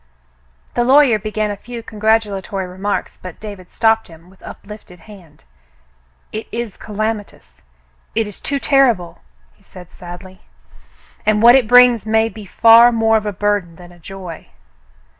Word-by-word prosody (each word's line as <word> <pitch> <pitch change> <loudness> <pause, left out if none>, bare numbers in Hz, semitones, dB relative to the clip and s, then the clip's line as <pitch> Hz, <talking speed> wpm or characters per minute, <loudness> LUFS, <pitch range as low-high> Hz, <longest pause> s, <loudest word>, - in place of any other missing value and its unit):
The 240 - 0
lawyer 260 -3 +4
began 215 0 -3
a - - -4
few 235 +3 -10
congratulatory 210 -3 -1
remarks, 190 +3 -4
but 185 -2 -10
David 200 -4 -10
stopped 225 -1 +1
him, 165 +2 -17
with 190 - -23
uplifted 200 -4 -12
hand. 170 -6 -17 0.9
It 220 - -6
is 235 -3 -5
calamitous. 215 0 -6 0.5
It 225 0 +1
is 205 -2 -9
too 280 - -3
terrible," 250 - +1 0.3
he - - -32
said 180 -2 -15
sadly. 185 +1 -12 0.8
"And 215 0 +1
what 240 +1 +8
it 260 -4 +3
brings 245 -2 +5
may 220 +1 +2
be 215 -2 -12
far 230 +4 +6
more 225 -1 +2
of 215 -1 0
a - - -1
burden 205 -3 -2
than 175 +1 -15
a 175 - -18
joy." 180 -1 -10
210 Hz, 150 wpm, -17 LUFS, 185-225 Hz, 0.9 s, what